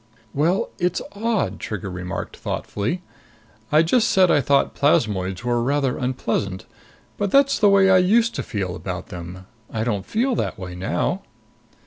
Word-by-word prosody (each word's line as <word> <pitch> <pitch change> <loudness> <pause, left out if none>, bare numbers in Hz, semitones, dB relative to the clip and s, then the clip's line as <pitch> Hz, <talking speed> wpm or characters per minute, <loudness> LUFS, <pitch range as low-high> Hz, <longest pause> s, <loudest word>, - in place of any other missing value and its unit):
"Well, 175 +10 +1
it's 180 0 0
odd!" 225 +1 -1
Trigger 100 -3 -5
remarked 90 +1 -5
thoughtfully. 120 - -3 0.7
"I 155 +2 +5
just 230 +8 +3
said 185 -5 +4
I 145 - +4
thought 140 +2 +2
plasmoids 100 -9 +1
were 120 -1 +1
rather 135 +1 +1
unpleasant. 115 -7 -2 0.5
But 205 - 0
that's 275 +5 +4
the 210 - +5
way 195 -1 +5
I 185 - +7
used 225 +6 +3
to - - -3
feel 95 -4 -3
about 90 -1 -6
them. 90 +1 -8 0.2
I 110 -1 -2
don't 105 -5 -1
feel 250 +4 +1
that - - -2
way 90 -1 -7
now." 90 +2 -1
130 Hz, 155 wpm, -22 LUFS, -, 0.7 s, I